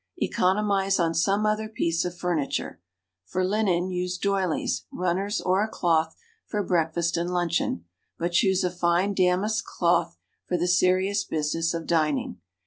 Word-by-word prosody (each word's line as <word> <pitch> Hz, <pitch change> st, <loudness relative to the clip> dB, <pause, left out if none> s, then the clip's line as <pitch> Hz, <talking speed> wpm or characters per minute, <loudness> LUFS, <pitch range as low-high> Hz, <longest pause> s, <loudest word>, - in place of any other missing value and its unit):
Economize 195 Hz, 0 st, +1 dB
on 165 Hz, -1 st, +1 dB
some 195 Hz, +6 st, +1 dB
other 215 Hz, 0 st, 0 dB
piece 170 Hz, -6 st, 0 dB
of 180 Hz, 0 st, -5 dB
furniture. 170 Hz, -, -2 dB, 0.5 s
For 185 Hz, 0 st, -1 dB
linen, 185 Hz, -3 st, +1 dB
use 180 Hz, 0 st, -2 dB
doilies, 190 Hz, -3 st, -1 dB
runners 185 Hz, +3 st, -1 dB
or 185 Hz, +3 st, +2 dB
a -, -, -1 dB
cloth 165 Hz, -6 st, 0 dB, 0.3 s
for 210 Hz, -2 st, -1 dB
breakfast 170 Hz, -1 st, 0 dB
and 170 Hz, +1 st, -1 dB
luncheon, 170 Hz, -, -1 dB, 0.3 s
but 170 Hz, +1 st, -2 dB
choose 190 Hz, +1 st, +3 dB
a 180 Hz, -, 0 dB
fine 175 Hz, +3 st, +1 dB
damask 195 Hz, +4 st, +1 dB
cloth -, -, 0 dB, 0.3 s
for 180 Hz, -, 0 dB
the 175 Hz, +1 st, 0 dB
serious 185 Hz, +2 st, +2 dB
business 165 Hz, 0 st, -1 dB
of 165 Hz, -1 st, -4 dB
dining. 150 Hz, -, 0 dB
180 Hz, 145 wpm, -26 LUFS, 170-195 Hz, 0.5 s, choose